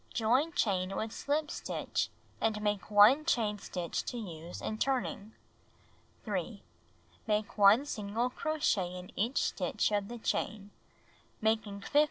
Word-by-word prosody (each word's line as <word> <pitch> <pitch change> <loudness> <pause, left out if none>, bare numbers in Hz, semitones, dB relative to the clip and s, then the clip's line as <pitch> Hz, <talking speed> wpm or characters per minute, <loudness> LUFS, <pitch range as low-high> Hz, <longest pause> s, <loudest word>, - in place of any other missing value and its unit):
Join 250 +8 +2
chain 190 -5 0
with 220 0 -2
slijo 300 +6 -1
stitch - - -2 0.3
and 220 -1 +1
make 205 -1 -1
1 215 +8 +7
chain 215 -9 +1
stitch 175 -3 -3
to 245 - -4
use 170 -6 -7
in 215 - -4
turning. 245 -5 -1 0.9
3. - - -3 0.6
Make 210 -1 0
1 210 +6 +6
single 230 -1 -2
crochet 215 - 0
in 180 0 -9
each 235 +6 0
stitch - - 0
of 205 -1 0
the 240 - -6
chain, 210 -2 -2 0.7
making 220 -2 0
Make - - -11
tassel. 290 - +3
215 Hz, 140 wpm, -32 LUFS, 200-245 Hz, 0.9 s, 1